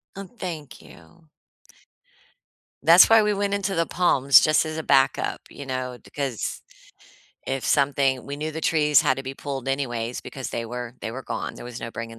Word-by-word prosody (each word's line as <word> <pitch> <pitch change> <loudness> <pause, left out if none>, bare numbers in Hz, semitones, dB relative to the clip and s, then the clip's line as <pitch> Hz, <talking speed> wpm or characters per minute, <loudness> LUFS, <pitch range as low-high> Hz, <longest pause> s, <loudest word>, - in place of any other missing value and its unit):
Oh, 195 0 -8
thank 155 - -7
you. 80 - -18 1.6
That's 170 +2 +8
why 225 -1 +6
we 210 0 +1
went 200 0 -1
into 200 -1 -2
the 165 0 +1
palms, 140 -6 +4
just 155 +1 +3
as 155 0 -5
a 160 - -3
backup, 135 -3 +2
you 140 - -10
know, 130 -1 -4
because 135 -6 -4 0.9
if 135 -1 -3
something 140 -2 +1
we 140 +1 -5
knew 155 +2 -4
the 160 +1 -6
trees 150 -2 +3
had 130 -3 +1
to 135 - -5
be 130 0 -6
pulled 135 -2 -6
anyways, 120 -4 -2
because 135 -2 -7
they 115 - -4
were 120 0 -6
they - - -4
were 130 +3 -7
gone. - - -5
There - - -10
was 120 0 -8
no 115 - -5
bringing 115 0 -7
135 Hz, 185 wpm, -24 LUFS, 125-160 Hz, 1.6 s, That's